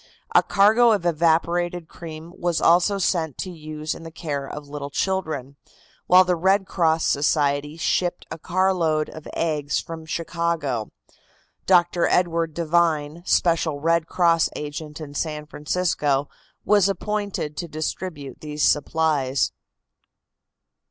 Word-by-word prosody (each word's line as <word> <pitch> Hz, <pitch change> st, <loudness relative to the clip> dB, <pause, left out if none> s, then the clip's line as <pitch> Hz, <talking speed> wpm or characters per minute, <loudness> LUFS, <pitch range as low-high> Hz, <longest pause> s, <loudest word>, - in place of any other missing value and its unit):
A -, -, +7 dB
cargo 220 Hz, +4 st, +4 dB
of 200 Hz, -5 st, -1 dB
evaporated 170 Hz, +1 st, +1 dB
cream 165 Hz, 0 st, -10 dB
was 175 Hz, -1 st, -1 dB
also 180 Hz, +4 st, +4 dB
sent 165 Hz, -6 st, 0 dB
to 185 Hz, -, -4 dB
use 155 Hz, -2 st, -5 dB
in -, -, -10 dB
the 165 Hz, -, -8 dB
care 145 Hz, -4 st, -4 dB
of 150 Hz, -1 st, -8 dB
little 140 Hz, -1 st, -6 dB
children, 155 Hz, -6 st, -2 dB, 0.5 s
while 185 Hz, +1 st, +7 dB
the 180 Hz, -1 st, +1 dB
Red 190 Hz, +3 st, +2 dB
Cross 165 Hz, -3 st, +1 dB
Society 145 Hz, +1 st, +1 dB
shipped 175 Hz, +1 st, 0 dB
a -, -, -6 dB
carload 175 Hz, -4 st, +1 dB
of 155 Hz, -, -10 dB
eggs 150 Hz, -3 st, 0 dB
from 160 Hz, -1 st, -8 dB
Chicago. 165 Hz, -8 st, -2 dB, 0.8 s
Dr. 175 Hz, -1 st, +4 dB
Edward 165 Hz, -3 st, +1 dB
Devine, 165 Hz, -2 st, +1 dB
special 165 Hz, -4 st, +2 dB
Red 165 Hz, +1 st, +1 dB
Cross 170 Hz, -3 st, +3 dB
agent 150 Hz, +1 st, -6 dB
in 150 Hz, -2 st, -8 dB
San 150 Hz, 0 st, -3 dB
Francisco, 150 Hz, -3 st, -1 dB, 0.4 s
was 205 Hz, -2 st, +4 dB
appointed 200 Hz, -5 st, -3 dB
to 170 Hz, -, -4 dB
distribute 155 Hz, -2 st, -5 dB
these 150 Hz, -1 st, -3 dB
supplies. 145 Hz, -3 st, +1 dB
165 Hz, 125 wpm, -23 LUFS, 150-175 Hz, 0.8 s, A